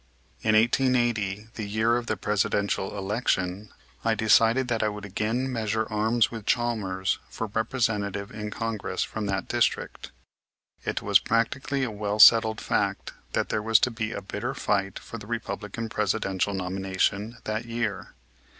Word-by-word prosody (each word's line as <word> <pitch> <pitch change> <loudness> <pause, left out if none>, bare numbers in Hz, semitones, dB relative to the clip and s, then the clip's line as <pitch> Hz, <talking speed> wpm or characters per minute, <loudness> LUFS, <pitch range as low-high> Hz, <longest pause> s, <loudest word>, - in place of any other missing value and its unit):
In 110 - +3
1880, 115 -3 +2
the 105 -2 -5
year 110 +3 +2
of 120 -1 -2
the - - -1
Presidential 100 -1 0
election, 100 -1 -1 0.3
I 115 -1 +2
decided 115 +3 +4
that 120 -2 0
I 110 - +2
would 105 0 -7
again 110 +6 -1
measure 110 -1 0
arms 110 +2 +2
with 115 -3 -7
Chalmers 105 -6 0
for 110 - -4
Representative 105 -3 -1
in 105 -1 -5
Congress 115 -1 -2
from 110 -2 -4
that 95 -1 -2
district. - - -1 0.7
It - - -2
was - - +5
practically 130 +4 0
a 125 - -1
well 105 0 -2
settled 110 0 +7
fact - - -1 0.2
that - - 0
there 105 - 0
was 110 +1 +5
to 130 - +2
be 110 -1 -3
a 100 - -5
bitter 95 - -4
fight 100 -2 0
for 115 - -8
the 105 - -11
Republican 115 -1 -4
Presidential 100 -2 -1
nomination 95 +4 -1
that 110 +2 -3
year. 115 -4 -3
110 Hz, 150 wpm, -26 LUFS, 100-115 Hz, 0.7 s, settled